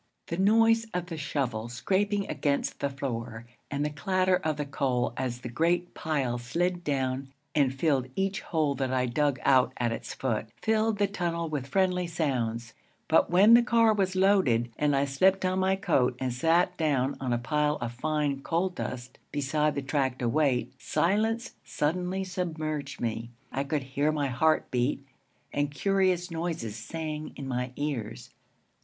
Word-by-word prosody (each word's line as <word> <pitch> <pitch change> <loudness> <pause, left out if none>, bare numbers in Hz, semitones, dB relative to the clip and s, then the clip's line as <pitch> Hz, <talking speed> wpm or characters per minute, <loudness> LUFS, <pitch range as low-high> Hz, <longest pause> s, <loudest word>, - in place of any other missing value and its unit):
The 170 - -2
noise 225 +3 +4
of 180 -1 -1
the 175 -2 -6
shovel 125 -7 -2
scraping 200 - 0
against 140 -2 -1
the 140 - 0
floor 120 -4 -5 0.2
and 145 +1 -1
the 150 - -2
clatter 185 +4 +1
of 155 -4 -2
the 150 - -2
coal 130 -4 0
as 125 -1 -3
the - - -5
great 170 +8 0
pile 135 -6 -1
slid 175 +8 -1
down 135 -2 -1 0.2
and 140 -4 +3
filled 135 -1 +1
each 195 +2 -1
hole 155 -4 0
that 135 -1 -2
I 130 -1 +1
dug 135 +2 0
out 130 -2 +4
at 120 -1 0
its 115 - -5
foot, 115 -5 -1
filled 220 -1 +1
the 205 - +3
tunnel 170 -4 -2
with 145 -4 -3
friendly 180 +3 +1
sounds; 120 -8 -2 0.3
but 160 - +4
when 195 +6 +6
the 235 - +9
car 230 -2 +4
was 190 -2 0
loaded 185 - +3
and 145 -1 +1
I 140 +1 +2
slipped 185 +8 +2
on 185 0 +1
my 190 0 +2
coat 135 -10 +1
and 130 -2 -1
sat 165 +7 +2
down 140 -4 +1
on 130 -2 -2
a 120 - +2
pile 150 +4 +1
of 120 -4 -4
fine 145 +2 -1
coal 170 +6 0
dust 125 -8 -6
beside 150 +1 0
the 140 - -2
track 135 -2 0
to 120 - -1
wait, 135 -1 +1
silence 220 +6 +1
suddenly 180 +5 -1
submerged 160 -5 -3
me. 115 0 -3 0.2
I 135 - -1
could 145 0 -2
hear 140 +3 0
my 145 -3 -1
heart 155 +6 +2
beat, 130 +2 0 0.5
and 145 0 0
curious 185 +3 +1
noises 165 -10 -3
sang 155 +6 -5
in 140 - -6
my 125 0 -2
ears. 125 - -4
150 Hz, 170 wpm, -28 LUFS, 130-180 Hz, 0.5 s, the